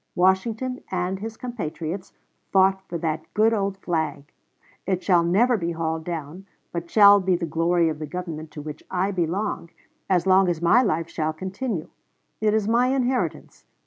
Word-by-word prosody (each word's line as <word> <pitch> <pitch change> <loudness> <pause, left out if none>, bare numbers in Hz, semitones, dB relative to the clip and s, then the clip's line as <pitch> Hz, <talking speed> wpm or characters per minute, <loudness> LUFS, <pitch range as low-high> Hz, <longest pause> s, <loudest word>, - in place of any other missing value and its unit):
Washington 220 +8 +1
and 185 +1 -2
his 220 +2 -6
compatriots 180 -6 -5 0.4
fought 190 0 +4
for 170 - -3
that 160 -1 -3
good 220 +2 +4
old 200 -2 -1
flag. 155 -6 -3 0.6
It 185 -1 0
shall 175 -3 +4
never 225 +8 +3
be 170 -3 -2
hauled 160 -1 -3
down, 170 +3 -6 0.2
but 170 0 -5
shall 205 0 +7
be 185 -1 +1
the 170 0 -2
glory 165 +1 +2
of 155 -1 -3
the 155 - -5
Government 160 -2 -6
to 150 - -7
which 150 0 -7
I 190 +2 0
belong, 180 0 -2 0.4
as 185 -2 +2
long 190 0 +5
as 170 -2 -1
my 170 +9 +5
life 165 -8 0
shall 155 -1 -2
continue.... 190 +1 -4 0.5
It 215 0 +2
is 215 -2 0
my 240 +3 +3
inheritance. 260 -1 -2
180 Hz, 170 wpm, -24 LUFS, 165-205 Hz, 0.6 s, shall